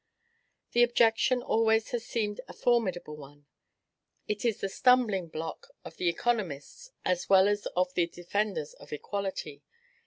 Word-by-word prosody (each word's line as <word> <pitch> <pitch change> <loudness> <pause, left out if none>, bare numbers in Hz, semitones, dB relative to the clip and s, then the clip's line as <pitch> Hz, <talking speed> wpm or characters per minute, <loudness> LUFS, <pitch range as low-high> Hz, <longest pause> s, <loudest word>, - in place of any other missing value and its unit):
This 240 - +5
objection 240 +1 +3
always 220 0 +2
has 240 -2 -2
seemed 215 -4 -2
a - - -10
formidable 185 -10 0
one. 145 0 -14 0.8
It 210 -1 -2
is 230 -4 0
the - - -1
stumbling 220 -5 +3
block 160 0 -6 0.2
of 160 - -10
the 175 - +1
economists, 215 - -2 0.2
as 180 -1 0
well 190 0 +6
as 205 0 0
of 180 0 +1
the 175 -2 +2
defenders 175 -1 -3
of - - -16
equality. 160 -3 -4
200 Hz, 145 wpm, -29 LUFS, 175-230 Hz, 0.8 s, well